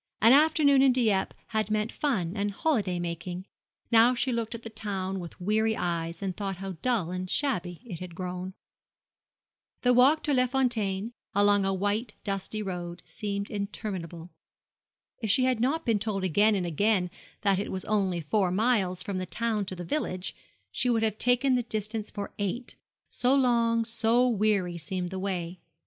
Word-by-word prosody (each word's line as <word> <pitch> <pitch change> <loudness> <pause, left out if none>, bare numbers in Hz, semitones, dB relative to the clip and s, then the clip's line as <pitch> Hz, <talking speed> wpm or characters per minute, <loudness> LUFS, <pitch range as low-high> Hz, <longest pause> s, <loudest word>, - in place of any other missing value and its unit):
An 230 +4 +7
afternoon 290 -2 +5
in 270 -1 +5
Dieppe 220 -6 +1
had 215 -1 0
meant 215 +1 0
fun 195 - -1
and 205 0 0
holiday 200 - 0
making. 175 +1 -4 0.5
Now 230 +2 +6
she 255 +2 0
looked 230 -1 -2
at 230 - -9
the 225 - -6
town 195 -3 -3
with 170 -2 -9
weary 220 +4 +1
eyes, 170 0 -2
and 190 -2 -2
thought 195 -2 -3
how 195 +1 -5
dull 225 -9 0
and 185 0 -4
shabby 180 - -1
it 180 -9 -7
had 180 -2 -8
grown. 180 +1 -5 1.3
The 250 -1 +5
walk 270 +6 +5
to 295 - +1
Les 255 -1 +3
Fontaines, 230 -5 0 0.2
along 205 -1 +4
a 195 - +1
white 205 +4 -1
dusty 200 +2 -2
road, 175 -2 -5
seemed 200 -1 -3
interminable. 185 -5 -5 0.9
If 220 - -2
she 240 +6 +4
had 255 -2 +2
not 285 +7 0
been 225 -4 +2
told 200 -2 -2
again 205 +4 +3
and 185 -3 -1
again 180 +2 +1 0.3
that 195 -2 +2
it 205 - -3
was 185 - -3
only 195 -5 0
four 185 +5 +1
miles 190 -3 +1
from 200 -3 -3
the 185 - -4
town 220 0 -1
to 185 - -5
the 175 -1 -6
village, 185 - -2 0.4
she 250 - 0
would 225 -2 +2
have 215 -1 -1
taken 250 +2 +3
the 250 - +3
distance 215 -1 -3
for 205 -1 -6
eight 220 +5 -3 0.4
so 250 +2 +3
long, 235 -3 +3
so 230 +2 +3
weary, 205 -6 +1
seemed 180 +3 -3
the 190 +1 -5
way. 180 -2 -3
205 Hz, 175 wpm, -28 LUFS, 185-235 Hz, 1.3 s, An